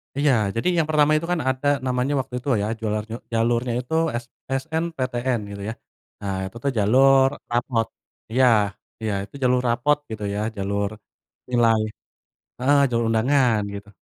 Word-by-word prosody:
Iya, 145 +1 +3 0.2
jadi 115 - -1
yang 160 - +1
pertama 150 -1 +4
itu 165 +2 -3
kan 180 - +1
ada 130 +2 -1 0.2
namanya 125 +2 0
waktu 125 - -9
itu 125 - -13
ya, 105 - -1
jualan 105 -1 -1 0.3
jalurnya 120 +1 +1
itu 125 +5 -8 0.3
s - - -22 0.2
SMPTN 130 -3 -1
gitu 100 0 -7
ya. - - -3 0.5
Nah, 100 -1 -2
itu 95 - -13
tuh 140 - +1
jalur 135 +6 +5 0.2
raport. 120 -2 0 0.4
Iya 130 +2 +4 0.6
iya 110 -2 -1
itu 105 - -13
jalur 125 0 +3
raport 135 +5 +2
gitu 105 -1 -5
ya 100 - -2 0.2
jalur 100 +1 -1 0.6
nilai 115 -2 +4 0.8
heeh 140 +3 +4
jalur 115 -1 0
undangan 120 -1 +3
gitu. 100 0 -9
125 Hz, 155 wpm, -23 LUFS, 110-135 Hz, 0.8 s, jalur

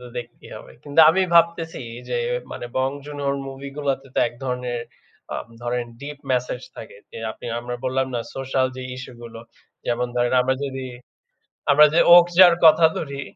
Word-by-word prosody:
তো 125 - -11
দেখতেই 120 0 -10
হবে। - - -12
কিন্তু 145 +2 +3
আমি 185 +4 +1
ভাবতেছি 170 -1 +2 0.3
যে - - -1 0.4
মানে - - -6
Bong 130 +1 0
Joon-ho 145 -1 -4
র - - -3
মুভি 135 +1 -8
গুলাতে 135 -2 -2
তো - - -1
এক 120 - -16
ধরনের, 125 -2 -3 0.5
আ - - -2 0.3
ধরেন 120 0 -2 0.2
ডিপ 145 0 -8
ম্যাসেজ 125 0 -1
থাকে। 110 - -10
যে - - -9
আপনি - - -11
আমরা 120 +1 -5
বললাম 130 +1 0
না 120 - -1 0.2
সোশ্যাল 135 0 0
যে 130 - -6
ইস্যু 130 0 -9
গুলো। 115 -1 -10 0.5
যেমন 120 +1 0
ধরেন, 120 0 +1
আমরা 130 +1 +1
যদি, 135 -1 -5 0.8
আমরা 150 +2 +8
যে 170 - +5
'ওকজার' 175 +1 +8
কথা 160 +1 +7
ধরি। 140 -2 -5
135 Hz, 175 wpm, -22 LUFS, 125-150 Hz, 0.8 s, আমরা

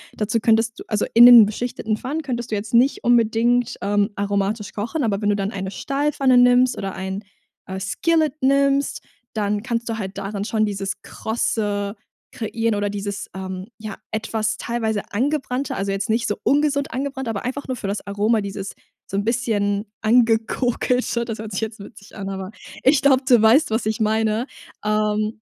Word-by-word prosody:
Dazu 215 +2 0
könntest 225 +2 +2
du - - -7
also 210 -1 0
in 235 +1 +9
den 240 -3 +10
beschichteten 220 0 -3
Pfannen 280 +8 -4
könntest 240 -4 -4
du - - +1
jetzt 205 +2 -5
nicht 250 +4 +3
unbedingt, 240 +1 +2
ähm, 205 +1 +1
aromatisch 200 +1 -1
kochen, 235 +9 -3
aber 205 -3 0
wenn 205 - +1
du 205 - +3
dann 200 0 -2
eine 190 -2 -4
Stahlpfanne 275 +2 +1
nimmst 245 0 +5
oder 195 -1 -4
ein, 190 +2 -4 0.4
äh, 190 0 -5
Skillet 310 - +1
nimmst, 275 +1 +2 0.3
dann 210 -1 -1
kannst 235 -1 -2
du 225 - -2
halt 195 -1 -5
daran 200 0 -4
schon 215 0 +1
dieses 200 0 -4
Krosse 205 -2 -2 0.4
kreieren 225 -1 -1
oder 205 0 -1
dieses, 200 0 -4
ähm, 190 0 -6
ja, 215 -1 -6 0.2
etwas 220 0 -2
teilweise 220 -3 -2
angebrannte, 265 +2 -1
also 195 0 -2
jetzt 195 +1 -2
nicht 230 +1 +1
so 205 - -1
ungesund 285 -1 +1
angebrannt, 265 0 -3
aber 220 -3 -3
einfach 265 +3 -4
nur 260 - -2
für 205 - -5
das 200 +1 -3
Aroma, 210 +2 +1
dieses 200 0 -5 0.4
so 195 - -2
'n 200 - 0
bisschen 210 -3 -1
angekokelte. 235 +1 +1
Das 225 -2 -5
hört 220 0 -6
sich 190 - -2
jetzt 220 0 -4
witzig 200 0 -13
an, 195 -2 -5
aber 190 0 -5 0.3
ich 265 +1 +4
glaube, 270 -1 +4
du 245 -4 +6
weißt, 225 +5 +5
was 220 0 0
ich 220 0 -1
meine, 220 +1 +1 0.4
ähm 215 0 0
220 Hz, 180 wpm, -22 LUFS, 205-245 Hz, 0.4 s, den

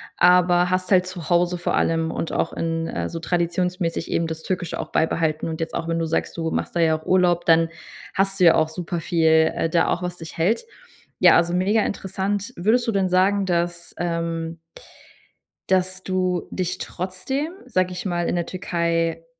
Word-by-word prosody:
aber 180 0 +4
hast 185 0 -1
halt 180 0 +5
zu 180 -2 -7
Hause 175 +1 +2
vor 175 - -1
allem 165 0 +1
und 165 - -3
auch - - -1
in 165 0 -2
äh, - - -3
so 165 - -5
traditionsmäßig 175 0 -1
eben 165 - 0
das 160 0 -6
Türkische 180 -3 -3
auch - - -6
beibehalten 160 0 0
und 160 - -5
jetzt 165 0 -3
auch, 165 - -3
wenn 165 0 0
du 165 - 0
sagst, 165 +1 -2
du 165 -1 -1
machst - - -2
da 170 - -1
ja 160 -1 +3
auch 155 - -16
Urlaub, 175 -2 +3
dann 165 0 +5 0.5
hast 195 0 0
du 180 - +5
ja 165 - +7
auch 160 -1 +2
super 170 +1 -4
viel, 160 -1 +3
äh, 165 - -1
da 165 +1 +2
auch 175 - 0
was 180 0 -3
dich 165 -2 -10
hält. 190 - +1 0.6
Ja, - - +7
also 170 0 +2
mega 200 +5 +2
interessant. 200 +4 -3
Würdest 225 +7 +1
du 225 - +1
denn 190 -2 +1
sagen, 195 +2 +3
dass, 170 -1 -2
ähm 165 -1 -2 1.1
dass 185 0 +1
du 185 -1 -1
dich 180 -1 -3
trotzdem, 265 - -4
sage 185 -7 0
ich 180 +2 -6
mal, 175 -2 -1
in - - 0
der 170 - -1
Türkei 165 -2 -1
175 Hz, 195 wpm, -23 LUFS, 165-185 Hz, 1.1 s, ja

